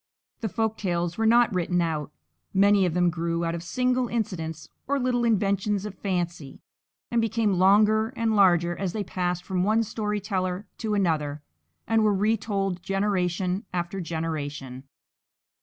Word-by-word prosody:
The 220 - -2
folk 220 +2 -1
tales 175 -1 -1
were 225 - +3
not 235 -1 +5
written 180 0 0
out; 160 -4 -1 0.4
many 200 -1 +5
of 170 - -3
them 175 -1 +3
grew 170 0 -2
out 165 - -1
of 170 - -4
single 250 +8 0
incidents 165 -9 -3 0.2
or 280 +1 +1
little 245 -1 +1
inventions 205 -2 +1
of 210 - -5
fancy, 175 -7 -3 0.5
and 235 -1 +2
became 225 -2 +1
longer 210 +3 +5
and 225 -1 0
larger 175 -3 +4
as 190 -2 -3
they 215 - -2
passed 180 -2 -2
from 185 -1 -1
one 220 +3 +3
story 210 -1 -2
teller 185 -1 -2
to 215 -2 -1
another 150 -6 0 0.4
and 225 -1 +2
were 210 -1 +3
retold 200 -3 0
generation 190 -1 0
after 180 +1 -3
generation. 145 -6 -4
190 Hz, 155 wpm, -26 LUFS, 175-215 Hz, 0.5 s, not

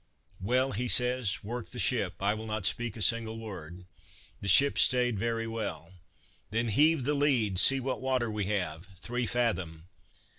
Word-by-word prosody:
"Well," 125 +7 0
says 125 -3 +4
he, - - -11
"work 120 0 -6
the - - -8
ship, - - 0
I 100 +1 +1
will 110 +1 -7
not 110 -3 -4
speak 115 +1 -1
a 105 - -1
single 115 +2 -1
word." 90 -5 -10 0.5
The 100 - -7
ship 140 +9 +5
stayed 125 -4 +2
very 115 +1 -2
well. 95 -7 -6 0.6
"Then, 115 +2 -2
heave 150 +6 +3
the 145 +4 0
lead! 125 -10 +1
see 135 +7 +7
what 130 0 -4
water 130 -3 -1
we 105 -2 -3
have!" 90 -4 -4
"Three 120 +6 -4
fathom." 90 -9 -2
115 Hz, 170 wpm, -28 LUFS, 100-125 Hz, 0.6 s, see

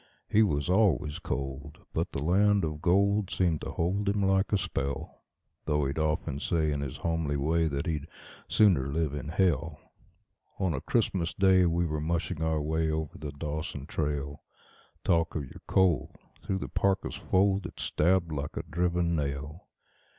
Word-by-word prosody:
He 110 - +4
was 75 -9 +1
always 90 - +2
cold, 70 +2 -4 0.2
but - - -1
the 70 - -3
land 100 +3 +3
of 75 -1 -5
gold 100 +3 +3
seemed 85 -6 +1
to - - -5
hold 100 +4 0
him 100 0 +1
like 95 0 +2
a 105 - +4
spell; 75 -6 -4 0.4
Though 75 -2 +1
he'd 70 +3 -2
often 75 -2 -1
say 80 -1 0
in 70 -1 -1
his 70 -1 -5
homely 80 -3 -1
way 80 +4 +1
that 70 -2 -2
he'd 80 -2 -2 0.4
"sooner 95 -11 +4
live 75 +1 -1
in 75 0 -5
hell". 80 -3 0 0.8
On 95 -4 0
a - - -3
Christmas 95 -7 0
Day 95 -2 +5
we 85 +1 +1
were 75 -2 -2
mushing 85 +1 -2
our 80 -2 0
way 80 +1 0
over 80 -1 -2
the 75 -1 -5
Dawson 75 -1 -5
trail. 75 -2 -3 0.6
Talk 85 -1 +2
of 75 - -1
your 65 - -11
cold! 90 -8 +2 0.2
through 95 - -2
the - - -4
parka's 95 -1 0
fold 95 0 +1
it - - -13
stabbed 85 +1 +1
like 70 -2 -4
a - - -2
driven 85 +1 0
nail. 75 +2 -4
80 Hz, 170 wpm, -29 LUFS, 75-95 Hz, 0.8 s, Day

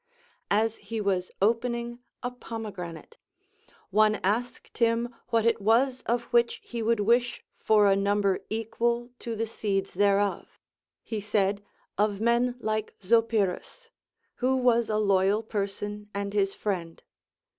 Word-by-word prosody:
As 220 +2 +2
he 225 -1 -5
was 190 -3 0
opening 235 +2 0 0.2
a 245 - -2
pomegranate, 205 -9 -7 0.7
one 215 +2 +4
asked 230 +7 -2
him 235 +1 +2
what 230 -1 +1
it 230 -1 +3
Avas 245 +5 +2
of 235 +1 +1
which 235 0 +3
he 235 -1 -5
would 225 -1 +1
wish 235 +3 +2 0.2
for 215 -1 +4
a 195 -1 +5
number 200 -1 +1
equal 235 +2 -1
to 230 -1 -4
the 225 +1 -1
seeds 195 -3 -2
thereof. 200 0 +1 0.4
He 220 -2 -4
said, 200 -1 0 0.4
Of 205 -1 +1
men 235 +2 +2
like 215 -2 -2
Zopyrus, 225 - 0 0.2
— - - -36
Avho 260 +1 +2
was 235 -2 +3
a 215 - +1
loyal 200 +1 +2
person 205 0 -4
and 200 0 -3
his 195 -1 +1
friend. 175 -5 -4
215 Hz, 135 wpm, -27 LUFS, 200-235 Hz, 0.7 s, a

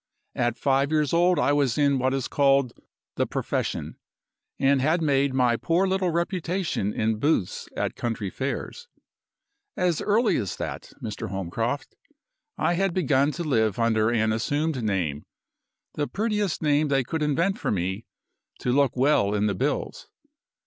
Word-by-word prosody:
At 120 -1 0
five 140 +1 +1
years 150 -1 +1
old 175 +1 +4
I 145 - +2
was 140 -5 +1
in 140 -2 +3
what 130 +1 +1
is 135 -2 -2
called 140 -3 +2 0.4
'the - - +1
profession,' - - -3 0.6
and 135 0 +3
had 155 +6 +2
made 140 -3 +2
my 125 -2 +2
poor 170 +8 +1
little 190 -1 +1
reputation 170 - -1
in 110 0 -1
booths 145 - 0
at - - -1
country 115 -5 -3
fairs. 140 - -4 0.9
As 180 -4 +1
early 215 +2 +2
as 100 -6 -3
that, - - -6
Mr. 105 -4 -5
Holmcroft, 100 +8 -3 0.6
I 175 - +1
had 190 0 0
begun 145 -4 +2
to 170 - -4
live 110 - +1
under 110 -2 +2
an 110 -2 +1
assumed 145 +5 -1
name 90 -9 -2 0.7
the 145 -1 -2
prettiest 210 -5 -1
name 150 0 +3
they 135 -2 +2
could 160 +6 -4
invent 165 +7 +1
for - - -2
me 95 +3 -2 0.6
'to 125 - 0
look 140 -2 +2
well 125 -7 +3
in 105 0 +1
the 105 - +1
bills. 135 +10 -2
140 Hz, 155 wpm, -25 LUFS, 115-160 Hz, 0.9 s, old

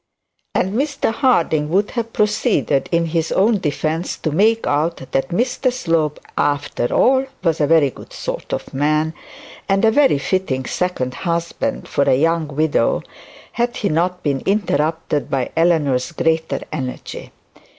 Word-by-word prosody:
And 190 - +1
Mr 275 -1 0
Harding 165 - +2
would 195 +5 +1
have 230 -2 -3
proceeded 210 - +1
in 170 -1 +2
his 165 0 -1
own 210 +2 +3
defence 160 +1 -2
to 155 - -2
make 220 +8 +3
out 150 +4 0
that 135 0 0
Mr 250 +6 0
Slope 165 - 0 0.2
after 145 -4 0
all 265 +1 +3 0.2
was 165 -3 +1
a 145 - +3
very 155 -3 +4
good - - -13
sort - - -5
of - - -4
man, 155 +3 +1 0.6
and 195 +3 +3
a 220 - +5
very 275 - +4
fitting 140 -5 -1
second 130 -9 -2
husband 170 - -2
for 140 - +1
a - - +4
young 165 +3 +1
widow, 150 +1 +1 0.5
had 240 0 -1
he 205 - 0
not 180 +3 0
been 140 -3 0
interrupted 160 -6 0
by 130 -2 -1
Eleanor's 160 -5 +2
greater 160 0 0
energy. 130 -5 -6
165 Hz, 150 wpm, -19 LUFS, 150-205 Hz, 0.6 s, a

